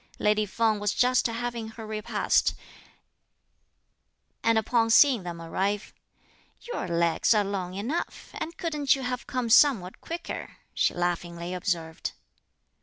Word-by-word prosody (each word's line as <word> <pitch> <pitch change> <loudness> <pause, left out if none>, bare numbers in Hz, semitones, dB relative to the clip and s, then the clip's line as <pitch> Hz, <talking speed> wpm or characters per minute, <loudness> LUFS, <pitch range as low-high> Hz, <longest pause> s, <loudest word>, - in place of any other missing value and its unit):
Lady 210 0 +2
Feng 220 +1 +1
was 205 0 -1
just 250 0 +3
having 235 0 -4
her 225 0 -9
repast, 215 0 +1 1.9
and 230 0 +3
upon 225 +1 +2
seeing 250 -1 +6
them 175 -2 -6
arrive: 195 +5 -2 0.7
"Your 480 - -4
legs 170 +5 +2
are 210 - +4
long 190 -2 -4
enough, 240 - -4
and 330 +1 -5
couldn't 300 -5 +1
you 270 - -6
have 250 0 -3
come 250 -2 -2
somewhat 225 -6 +4
quicker!" 340 +1 -6 0.2
she - - +1
laughingly 175 0 -2
observed. 170 -3 -3
215 Hz, 125 wpm, -27 LUFS, 180-245 Hz, 1.9 s, seeing